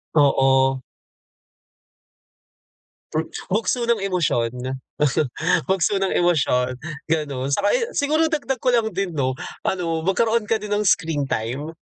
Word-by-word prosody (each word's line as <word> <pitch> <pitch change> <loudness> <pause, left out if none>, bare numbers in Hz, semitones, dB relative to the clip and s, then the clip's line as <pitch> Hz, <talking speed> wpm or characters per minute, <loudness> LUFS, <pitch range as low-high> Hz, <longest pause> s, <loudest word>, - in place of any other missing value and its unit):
Oo. 135 -2 +4 2.3
Hmm, 160 +1 -1 0.2
bugso 230 +4 +1
ng 235 -1 +2
emosyon, 125 -8 -1 1.0
bugso 190 +1 +1
ng 195 -1 0
emosyon, 130 -7 +2 0.3
ganun. 140 -4 -1
Tsaka - - +1
yung - - -1
siguro 310 0 +1
dagdag 285 -3 -1
ko 250 +1 0
lang 230 -2 +2
din 195 -2 -1
'no, 130 -5 -1 0.3
ano, 170 -3 -1
magkaroon 215 +6 +1
ka 225 - +2
din 210 -1 -5
ng 205 -1 +1
screen 155 -6 +1
time. 135 +8 -3
170 Hz, 120 wpm, -22 LUFS, 135-220 Hz, 2.3 s, Oo